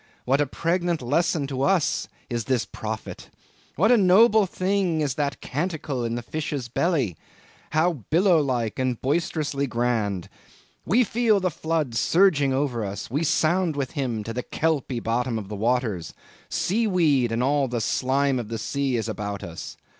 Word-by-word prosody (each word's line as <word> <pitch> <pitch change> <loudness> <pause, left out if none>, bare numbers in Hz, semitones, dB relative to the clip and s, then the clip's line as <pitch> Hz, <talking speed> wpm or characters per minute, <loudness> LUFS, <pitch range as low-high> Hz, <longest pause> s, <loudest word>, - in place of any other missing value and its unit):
what 135 +3 +2
a 145 - +1
pregnant 170 +3 0
lesson 145 +4 +1
to 135 -1 -4
us 180 +1 +1 0.2
is 120 -3 -3
this 130 -2 +1
prophet! 110 0 -6 0.5
What 210 - +3
a 245 - +6
noble 210 +2 +5
thing 185 -2 0
is 145 -4 0
that 140 0 -2
canticle 150 -4 -3
in 115 0 -2
the 120 - -4
fish's 145 -1 -4
belly! 135 - 0 0.5
How 170 +3 +2 0.2
billow 175 0 +4
like 125 -6 -1
and 130 -2 0
boisterously 145 -1 -1
grand! 115 -6 -1 0.6
We 245 +5 +4
feel 225 -2 +2
the 185 -1 0
floods 155 -8 -1
surging 160 - +3
over 130 -4 0
us; 100 +2 -5
we 145 +5 0
sound 165 +2 +2
with 135 -3 -2
him 125 -8 -2
to 115 - -5
the 125 - -2
kelpy 140 -4 -1
bottom 115 +1 -1
of 100 -3 -6
the 105 - -4
waters; 110 - -1 0.3
sea 220 +5 0
weed 150 - +2
and 115 +2 0
all 140 +1 +2
the 120 -1 -2
slime 135 +3 +1
of 115 - -5
the 115 +1 -4
sea 135 +3 -1
is 110 -2 -1
about 100 -2 -4
us! 85 -1 -8
140 Hz, 170 wpm, -24 LUFS, 120-165 Hz, 0.6 s, a